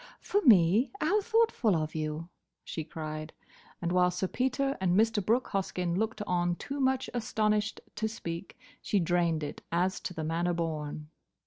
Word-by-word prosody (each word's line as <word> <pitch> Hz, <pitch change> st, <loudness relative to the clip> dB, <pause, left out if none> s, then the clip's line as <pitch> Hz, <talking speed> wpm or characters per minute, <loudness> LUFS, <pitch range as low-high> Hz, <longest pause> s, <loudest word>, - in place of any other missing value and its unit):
"For 410 Hz, -, 0 dB
me? 210 Hz, -, +6 dB
How 400 Hz, +7 st, +2 dB
thoughtful 445 Hz, -, +2 dB
of 155 Hz, -1 st, -2 dB
you!" 155 Hz, +1 st, -3 dB, 0.3 s
she 160 Hz, -, -4 dB
cried; 155 Hz, 0 st, -6 dB, 0.5 s
and 170 Hz, -, 0 dB
while 180 Hz, 0 st, +4 dB
Sir 180 Hz, +1 st, -2 dB
Peter 265 Hz, +5 st, 0 dB
and 185 Hz, -1 st, +2 dB
Mr. 225 Hz, -2 st, +2 dB
Brooke 230 Hz, +6 st, +1 dB
Hoskyn 180 Hz, -3 st, -1 dB
looked 220 Hz, +1 st, -1 dB
on 175 Hz, -2 st, +1 dB
too 280 Hz, +9 st, -5 dB
much 265 Hz, -1 st, +1 dB
astonished 215 Hz, -2 st, 0 dB, 0.2 s
to 220 Hz, +1 st, 0 dB
speak, 170 Hz, -5 st, -6 dB, 0.2 s
she 205 Hz, -, +1 dB
drained 170 Hz, -2 st, +1 dB
it 145 Hz, -, -6 dB
as 180 Hz, +3 st, +1 dB
to 180 Hz, -, -6 dB
the 160 Hz, -, -3 dB
manner 170 Hz, +3 st, 0 dB
born. 155 Hz, -2 st, -3 dB
180 Hz, 160 wpm, -30 LUFS, 165-225 Hz, 0.5 s, me